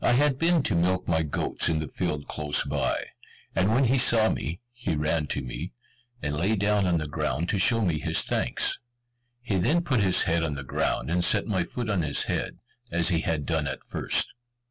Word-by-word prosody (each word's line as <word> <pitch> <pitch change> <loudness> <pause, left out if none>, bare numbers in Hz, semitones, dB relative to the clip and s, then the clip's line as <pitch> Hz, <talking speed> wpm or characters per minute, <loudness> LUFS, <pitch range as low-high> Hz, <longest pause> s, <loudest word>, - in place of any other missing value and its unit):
I - - +4
had 135 +1 +2
been 165 -2 +3
to 105 - 0
milk 90 +2 +1
my 80 -2 +2
goats 80 +2 0
in 80 - +1
the 80 -1 -3
field 75 +1 -3
close 75 -1 0
by, - - -1 0.5
and 95 +2 +2
when 120 +5 +3
he 130 +1 +3
saw 115 -2 +4
me, 80 +7 -3
he 120 -9 -3
ran 75 +1 0
to 70 - -3
me, - - -6 0.5
and 75 - -1
lay 95 +8 +1
down 100 -1 +1
on 85 -1 +2
the 75 -1 -3
ground 75 +2 -2
to 100 - +1
show 115 +1 +3
me 80 -4 0
his - - +1
thanks. - - +1 0.6
He 110 -5 -1
then 165 - +2
put 130 -9 +1
his 95 -2 +4
head 85 -1 +1
on 75 -3 -2
the 70 - -5
ground, 70 - -1
and 90 0 +2
set 100 +3 +3
my 95 -5 0
foot 120 +7 -5
on 100 -4 0
his 75 -3 +1
head, - - -3 0.3
as 85 0 +2
he 85 -3 +2
had 80 -3 -2
done 80 -3 0
at 65 - -5
first. - - 0
85 Hz, 215 wpm, -26 LUFS, 75-110 Hz, 0.6 s, I